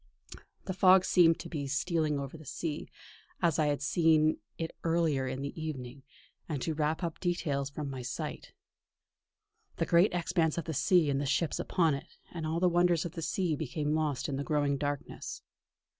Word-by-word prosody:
The 190 - -2
fog 185 0 +6
seemed 165 -3 +5
to - - -7
be 145 -4 -4
stealing 150 +1 0
over 140 +2 -6
the 155 - -11
sea, 150 +2 -4 0.5
as 165 -2 +2
I 155 - +3
had 145 -1 0
seen 155 0 +3 0.2
it 165 -1 -4
earlier 165 -5 +1
in 130 +1 -4
the 140 - -4
evening, 135 -4 -6 0.5
and 150 -3 -2
to 160 - -1
wrap 155 +3 -1
up 170 -2 -3
details 145 -6 -1
from 145 +1 -5
my 135 -2 -5
sight. 125 - -5 1.2
The - - 0
great 170 +4 +4
expanse 170 -2 0
of 170 - -2
the 160 - -3
sea 160 +1 +3
and 135 0 0
the 145 - -2
ships 155 +3 0
upon 165 -5 +2
it, 140 +4 -7
and 165 -2 -4
all 160 +2 -1
the 180 - +4
wonders 175 -1 +3
of 170 - -4
the 165 -1 -4
deep 175 -6 0
became 150 0 -2
lost 155 -4 0
in 140 - -2
the 140 - -2
growing 145 -1 +1
darkness. 145 -1 -4
155 Hz, 190 wpm, -31 LUFS, 140-170 Hz, 1.2 s, fog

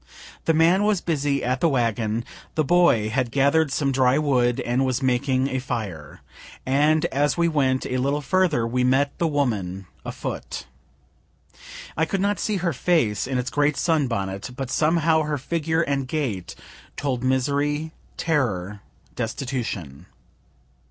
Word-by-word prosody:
The 165 - +3
man 170 +5 +4
was 210 -2 +2
busy 145 -5 -1
at 125 +1 -1
the 170 - +4
wagon, 115 -3 0 0.3
the 155 - +2
boy 145 -9 +3
had 125 +1 0
gather'd 140 +4 +2
some 140 0 0
dry 130 0 +3
wood, 125 -5 +2
and 120 +2 0
was 130 0 -1
making 130 +1 +1
a 130 - -1
fire 105 - -5 0.4
and 150 +4 +3
as 145 +4 +1
we 170 0 +3
went 135 -5 +1
a 130 - -2
little 140 +3 0
further 150 -4 +1
we 125 +2 0
met 135 +3 +2
the 170 - +2
woman 105 - -1 0.2
afoot. - - -5 1.3
I 160 - +2
could 195 +4 -2
not 205 +2 0
see 215 - -1
her 175 -3 0
face, 125 - +1
in 130 -1 -1
its 125 0 -2
great 145 0 +1
sun 160 -5 +2
bonnet, 100 -3 -3
but 135 -1 -5
somehow 160 +1 +3
her 150 -1 -1
figure 160 +3 -1
and 140 -3 -1
gait 125 - -3 0.4
told 130 -4 -2
misery, 145 +4 0 0.3
terror, 105 - -1 0.4
destitution. 115 - -4
135 Hz, 150 wpm, -24 LUFS, 125-155 Hz, 1.3 s, man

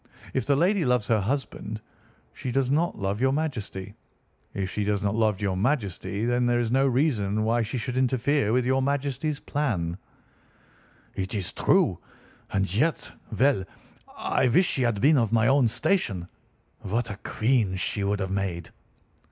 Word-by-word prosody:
If - - -1
the 140 - +4
lady 180 +5 +2
loves 125 -5 +2
her 110 -2 +4
husband, 110 -2 -3 0.5
she 130 - -5
does 135 0 +1
not 165 +4 +1
love 100 +1 -2
your 130 0 +3
Majesty. 115 -10 -3 0.6
If 95 -1 -2
she 105 - -1
does 105 0 0
not 100 0 +1
love 110 -2 +1
your 100 -2 0
Majesty, 105 -2 -1
there 120 0 +2
is 115 -2 -1
no 135 +2 +3
reason 115 -7 +1
why 115 +2 +2
she 115 +4 -3
should 125 +1 -3
interfere 130 -1 +2
with 125 +1 +2
your 130 +1 +2
Majesty's 140 +1 -1
plan." 100 - -2 1.1
"It 95 +3 -4
is 95 -4 -3
true. - - +2 0.5
And 95 -2 0
yet—! 150 +9 0 0.3
Well! 135 -6 +3 0.5
I - - +1
wish 180 +10 +4
she 135 - 0
had 115 -5 +1
been 145 +2 +5
of 115 -2 0
my 110 -1 +3
own 135 0 +4
station! 110 - 0 0.5
What 115 +3 -2
a 100 - -6
queen 110 -3 0
she 95 +2 -2
would 100 0 0
have 95 0 -2
made!" 95 -4 -3
115 Hz, 165 wpm, -26 LUFS, 100-135 Hz, 1.1 s, been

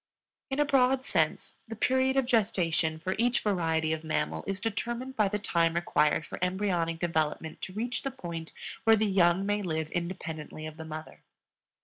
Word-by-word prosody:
In 270 +1 -2
a 295 - +4
broad 265 -1 +3
sense, - - 0
the 225 - -6
period 260 +4 +2
of 270 - +3
gestation 180 -9 +2
for 185 +4 -2
each 245 +1 +3
variety 160 -5 +1
of 160 0 -4
mammal 80 - -1
is 195 0 -2
determined 235 +5 -3
by 215 -4 +3
the 210 +2 -1
time 170 -4 +1
required 150 -2 +2
for - - -7
embryonic 180 -3 0
development 160 -2 -1
to 190 - -5
reach 235 +4 -2
the 275 - -2
point 170 -10 -7 0.3
where 225 -1 +6
the 220 0 +1
young 190 -1 +3
may 205 +1 0
live 160 -4 -2
independently 165 -3 -4
of 155 0 -8
the 160 - -7
mother. 155 0 -8
180 Hz, 175 wpm, -29 LUFS, 160-225 Hz, 0.3 s, where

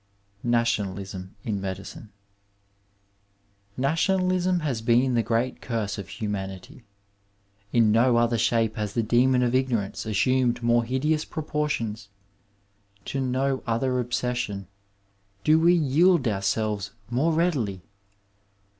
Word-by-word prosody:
II. 120 - -2
NATIONALISM 100 -5 -1
IN 100 -3 -2
MEDICINE 95 +2 -7 1.7
Nationalism 180 +5 +1
has 135 -7 -2
been 120 +3 +3
the 120 - +3
great 115 +3 -1
curse 110 -4 -3
of 95 - -7
humanity. 95 +1 -6 0.9
In 115 -3 +4
no 120 +2 +4
other 120 -1 +2
shape 115 -1 +1
has 105 -1 -3
the 115 - +1
Demon 125 +3 +3
of 120 0 +1
Ignorance 120 -6 -1
assumed 125 +3 +1
more 120 0 +3
iiideous 150 +6 0
proportions; 130 -9 -3 1.0
to 135 - -3
no 130 +1 0
other 125 +3 0
obsession 120 -5 -2 0.8
do 155 +1 +5
we 170 +2 +5
yield 165 +2 +3
ouieelves 105 -1 -1 0.2
more 140 +8 +2
readily. 140 - 0
120 Hz, 110 wpm, -25 LUFS, 105-135 Hz, 1.7 s, do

